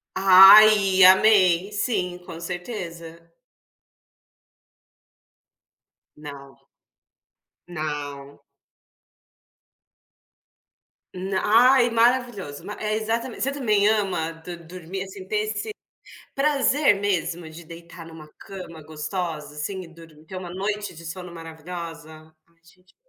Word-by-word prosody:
Ai, 195 +1 +7
amei. 190 -1 +5
Sim, 185 -4 -2
com 165 -2 -11
certeza. 170 -2 -8 2.9
Não. 140 -2 -12 1.1
Não. 145 -4 -7 2.7
Na 190 +1 -3 0.3
ai, 245 -2 +3
maravilhoso. 230 - 0 0.2
É 215 0 -2
exatament 225 +2 -3
você 275 - 0
também 215 -7 +1
ama, 190 -7 -1
do 165 +2 -10
dormir, 180 +2 -8
assim 190 -1 -10
ter 215 - -3
esse, 215 - -5 0.6
prazer 285 -1 +2
mesmo 175 -4 -2
de 165 +2 -12
deitar 170 0 -12
em - - -13
uma 155 -1 -13
cama 175 -5 -11
gostosa, 155 -1 -6
assim, 170 +6 -5
e 170 - -12
dor 165 0 -16 0.2
ter 190 - -9
uma 185 -1 -7
noite 205 0 -4
de 170 +1 -12
sono 180 +1 -8
maravilhosa? 165 -1 -10
Ai, 170 - -33
gente 180 +2 -25
180 Hz, 100 wpm, -23 LUFS, 165-205 Hz, 2.9 s, Ai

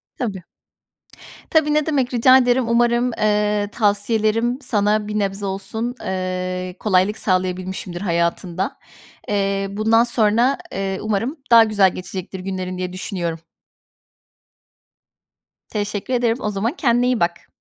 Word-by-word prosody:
Tabii. 200 -7 -4 1.1
Tabii, 305 -2 +3
ne 300 -1 +2
demek, 270 -5 0
rica 255 +2 +6
ederim. 245 -1 +2
Umarım, 240 +1 +2
eee, 210 -1 +1
tavsiyelerim 220 +3 +1
sana 210 -4 +1
bir 210 0 -2
nebze 200 0 -2
olsun, 210 +5 -3
eee, 185 -1 -3
kolaylık 205 +1 +2
sağlayabilmişimdir 185 -1 -2
hayatında. 170 0 -1 0.5
Eee, 195 -1 0
bundan 220 +3 +3
sonra, 235 +2 +2
eee, 195 0 -3
umarım 220 +7 -1
daha 230 -1 +9
güzel 205 -4 +3
geçecektir 185 +1 -6
günlerin 185 -1 -4
diye 180 0 -4
düşünüyorum. 175 -3 -4 2.3
Teşekkür 205 +3 -3
ederim. 240 -2 +1
O 210 - -2
zaman 210 +5 -1
kendine 245 -7 +2
iyi 250 -2 +1
bak. 170 0 -1
210 Hz, 120 wpm, -20 LUFS, 190-235 Hz, 2.3 s, daha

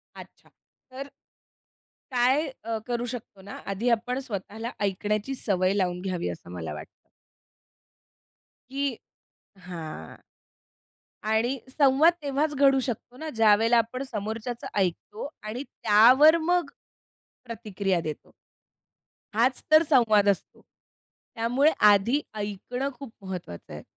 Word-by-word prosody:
अच्छा. - - -14 0.4
तर 275 +2 -7 1.0
काय 255 +5 +3 0.2
अ, 225 0 -2
करू 240 0 -1
शकतो 230 -5 -8
ना, 200 +1 -11 0.2
आधी 200 +5 -1
आपण 245 +2 0
स्वतःला 225 -2 -5
ऐकण्याची 210 +5 -1
सवय 185 -4 +1
लावून 180 -3 0
घ्यावी 180 - -2
असं 85 0 -8
मला 80 -4 -5
वाटतं. 75 - -8 1.8
की 280 +1 -1 0.8
हां. 160 - -7 1.1
आणि 220 +5 +1 0.2
संवाद 290 +4 +5
तेव्हाच 290 +2 0
घडू 275 -1 +5
शकतो 245 0 -5
ना 315 +3 -5
ज्यावेळेला 225 +2 +5
आपण 235 +3 0
समोरच्याचं 220 +3 -4
ऐकतो 195 +7 -2
आणि 220 +5 -5
त्यावर 255 +8 +6
मग 345 -1 +1 0.8
प्रतिक्रिया 205 -6 -2
देतो. 155 -2 -7 1.0
हाच 250 +3 +2
तर 310 +1 +8
संवाद 220 -7 +4
असतो. 200 - -2 0.7
त्यामुळे 245 +7 +3 0.2
आधी 215 +8 +3
ऐकणं 210 +6 -3
खूप 270 -5 -8
महत्वाचं 180 - -7
आहे. - - -8
230 Hz, 110 wpm, -26 LUFS, 200-265 Hz, 1.8 s, तर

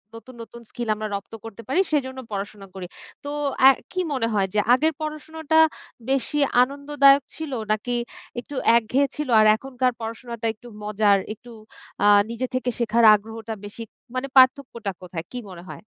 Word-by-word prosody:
নতুন, 255 +3 -12
নতুন 235 +1 -11
স্কিল 240 -2 -6
আমরা 215 0 -4
রপ্ত 200 +3 -8
করতে 225 0 -9
পারি 275 +8 +1
সেজন্য 260 -3 -1
পড়াশোনা 200 0 -6
করি। 185 -2 -6 0.4
তো 285 - -6 0.4
আ - - +11 0.2
কি 370 - -3
মনে 230 -4 0
হয় 195 -2 +1
যে 210 - +2
আগের 315 +5 +2
পড়াশোনাটা 315 +1 -1 0.5
বেশি 275 +2 0 0.3
আনন্দদায়ক 280 0 +3
ছিল 315 -3 -6 0.2
নাকি 240 +3 -1 0.4
একটু 280 +4 -9 0.2
একঘেয়ে 255 +5 +1
ছিল 300 -2 -4
আর 215 - +5
এখনকার 255 +1 -1
পড়াশোনাটা 230 0 -6
একটু 240 +3 -16 0.2
মজার 210 -1 +3 0.2
একটু 240 +2 -15 0.5
আ - - +4 0.2
নিজে 235 +2 -3
থেকে 255 -1 -1
শেখার 235 0 +2
আগ্রহটা 225 +1 -7
বেশি 210 +3 -8 0.3
মানে 260 +2 -2
পার্থক্যটা 255 -5 +3
কোথায়? 175 -2 -7
কি 250 - -6
মনে 175 -1 -11
হয়? 155 - -9
240 Hz, 160 wpm, -23 LUFS, 215-275 Hz, 0.5 s, আ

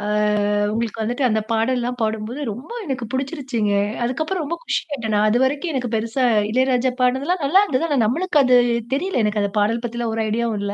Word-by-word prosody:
ஆ - - -7 0.7
உங்களுக்கு 225 0 -2
வந்துட்டு 245 +5 -1
அந்த 220 -2 +1
பாடல்லலாம் 245 +2 0
பாடும்போது, 220 +4 -2
ரொம்ப 245 - -8
எனக்கு 265 -5 -3
பிடிச்சிருச்சுங்க. 260 -6 -2 0.3
அதுக்கப்புறம் 315 +9 -1
ரொம்ப 305 +3 -3
குஷியாயிட்டேன் 255 - -2
நான். 210 +1 +3
அதுவரைக்கும் 265 +8 +1
எனக்கு 250 -3 -2
பெருசா 230 +4 -1 0.3
இளையராஜா 255 +1 +2
பாடுனதுலாம் 275 +8 +1
நல்லா 315 +8 +5
இருந்தது. 330 -6 0
ஆனா 290 -3 0
நம்மளுக்கு 310 - 0
அது 255 -1 +4 0.4
தெரியல. 310 -1 0
எனக்கு 210 0 0
அந்த 200 -1 -1
பாடல் 225 +3 +1
பத்திலாம் 235 -1 -3
ஒரு 225 - -1
ஐடியாவும் 230 0 -1
இல்ல. 200 0 -2
245 Hz, 175 wpm, -21 LUFS, 225-275 Hz, 0.7 s, நல்லா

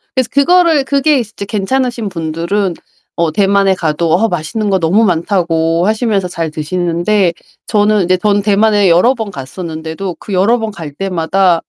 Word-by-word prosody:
그래서 260 -3 0
그거를 325 +1 +3
그게 280 +1 +2
이제 220 -3 -6
괜찮으신 235 +2 -2
분들은 170 +3 -2 0.4
어 170 -2 0
대만에 195 +2 +2
가도 160 -1 -1
어 205 +7 +3
맛있는 200 +5 -2
거 190 -1 +2
너무 180 +7 +2
많다고 170 -3 0
하시면서 215 -3 0
잘 165 -3 -4
드시는데 175 +4 0 0.3
저는 210 -2 +2
이제 185 +1 +2
전 205 +2 +1
대만에 205 -1 +3
여러 180 +10 +4
번 225 -5 -5
갔었는데도 160 +4 -6
그 205 - -7
여러 200 +6 +3
번 220 -1 -3
갈 165 -7 -8
때마다 180 0 0
195 Hz, 340 characters per minute, -14 LUFS, 170-215 Hz, 0.4 s, 여러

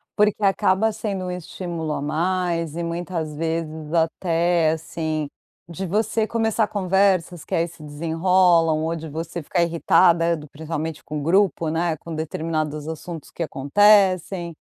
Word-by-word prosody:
Porque 210 0 +2
acaba 195 +2 +3
sendo 205 -3 -4
um 180 - -3
estímulo 170 -2 -5
a - - -3
mais, 170 0 -1
e 170 - -3
muitas 170 -2 -4
vezes 160 -1 -3
até, 165 0 +2
assim, 160 -1 -3 0.4
de 190 +3 -5
você 215 +4 0
começar 225 -1 +1
conversas, 190 -4 +1
que - - -8
aí 165 +1 +2
se 165 -2 -14
desenrolam, 165 +1 +2
ou 165 +1 -1
de 160 0 -7
você 165 +3 -5
ficar 170 - 0
irritada 170 0 +3
do 150 -1 -10
principalmente 160 0 -5
com 150 0 -5
o - - -5
grupo, 170 -2 +2
né, 165 0 0
com 165 +2 -8
determinados 155 -1 -3
assuntos 160 0 -7
que 170 - -4
acontecem. 185 +3 +3
170 Hz, 145 wpm, -23 LUFS, 160-185 Hz, 0.4 s, acaba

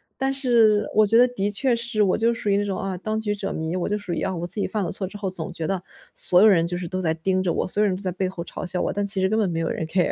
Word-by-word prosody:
但 270 0 -1
是 230 -6 +3
我 215 0 +5
觉 225 +3 +4
得 245 - +6
的 205 -5 -2
确 240 +5 +1
是 235 -2 -1
我 190 - +2
就 230 +2 +2
属 225 - -6
于 200 - +3
那 205 - +1
种 195 -2 -3
啊 195 -1 -3
当 215 +4 -3
局 210 -1 -1
者 200 -1 -4
迷， 160 +2 -3
我 180 +1 -2
就 210 - 0
属 205 -4 -5
于 - - -2
啊 190 - -1
我 175 -1 -4
自 195 +4 -1
己 - - 0
犯 210 -2 -2
了 - - -3
错 195 - -3
之 205 +2 -9
后 200 - -4
总 185 +1 -5
觉 165 -2 -4
得， 190 -2 -2 0.3
所 180 - +4
有 215 - +7
人 170 -5 +4
就 175 +1 -2
是 175 -1 -5
都 185 +2 -3
在 160 -3 +1
盯 185 +3 0
着 175 - 0
我， - - -1
所 205 +3 0
有 210 - +4
人 185 - 0
都 - - -10
在 185 -2 -2
背 185 +1 -2
后 175 -2 -7
嘲 - - -7
笑 180 0 -1
我， - - -1
但 205 0 -1
其 195 -1 0
实 190 - +2
根 220 +3 0
本 200 -4 +1
没 165 -1 -2
有 165 - -1
人 160 - -3
care。 180 +1 +1
195 Hz, 400 characters per minute, -23 LUFS, 180-215 Hz, 0.3 s, 有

